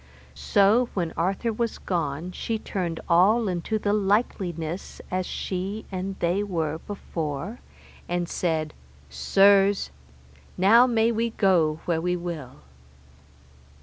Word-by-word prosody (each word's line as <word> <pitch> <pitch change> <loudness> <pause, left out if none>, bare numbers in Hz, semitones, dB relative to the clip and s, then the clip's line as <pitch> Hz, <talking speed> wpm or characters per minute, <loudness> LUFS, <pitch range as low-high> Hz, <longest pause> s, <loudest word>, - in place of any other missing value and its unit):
So 200 - +3
when 170 -4 -1
Arthur 195 +7 -1
was 230 0 -2
gone 165 -1 -3
she 225 +4 -3
turned 175 -6 -3
all 205 +7 +4
into 185 +4 -1
the 205 -1 0
likeliness 190 -5 -1
as 185 0 -1
she 195 +3 -4
and 190 +1 -4
they 175 +4 +1
were 165 -6 -2
before, 170 - -5 0.5
and 175 0 -1
said, 160 -3 -1 0.4
Sirs, 195 - +4 0.7
now 225 +7 +6
may 230 -1 +2
we 230 +1 0
go 170 -8 +2
where 165 -2 0
we 180 +1 0
will. 165 - -6
185 Hz, 115 wpm, -25 LUFS, 165-205 Hz, 0.7 s, now